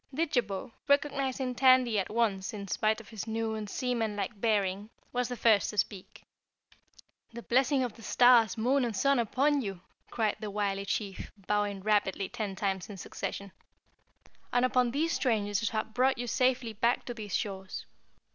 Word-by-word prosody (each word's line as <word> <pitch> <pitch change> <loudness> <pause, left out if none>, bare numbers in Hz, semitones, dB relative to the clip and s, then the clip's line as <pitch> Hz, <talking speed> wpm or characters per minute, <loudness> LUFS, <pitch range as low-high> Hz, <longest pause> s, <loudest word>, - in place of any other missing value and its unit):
Didjabo, 245 - -1 0.2
recognizing 275 -2 +1
Tandy 255 -3 +4
at 190 - -2
once 215 -3 0
in 200 -1 -6
spite 215 +3 +1
of 225 - -13
his 220 -1 -6
new 225 0 -2
and 215 -2 -5
seaman 235 -3 -1
like 200 0 -4
bearing, 205 -2 0 0.2
was 250 0 0
the 245 - -4
first 220 -4 +4
to 210 - -7
speak. 195 -2 -3 1.1
"The 235 0 -8
blessing 265 +2 +2
of 245 -4 -3
the 230 - -15
stars, 235 -1 +5
moon 255 +5 +2
and 235 -3 -2
sun 275 +5 +3
upon 275 +5 +2
you!" 195 -6 -5 0.3
cried 220 -3 0
the 215 - -5
wily 200 -1 -1
chief, 200 -1 -3
bowing 205 0 -1
rapidly 200 -2 +1
ten 205 -3 -4
times 195 0 -2
in 200 - -8
succession, 200 +2 -6 1.0
"And 245 +1 +3
upon 250 -1 +2
these 310 +7 0
strangers 205 -5 +1
who 225 - -1
have 220 0 -3
brought 260 +2 +2
you 245 - -3
safely 250 -1 +1
back 235 +4 +1
to 240 - -4
these 210 -5 -5
shores! 190 -2 -4
220 Hz, 170 wpm, -30 LUFS, 205-250 Hz, 1.1 s, stars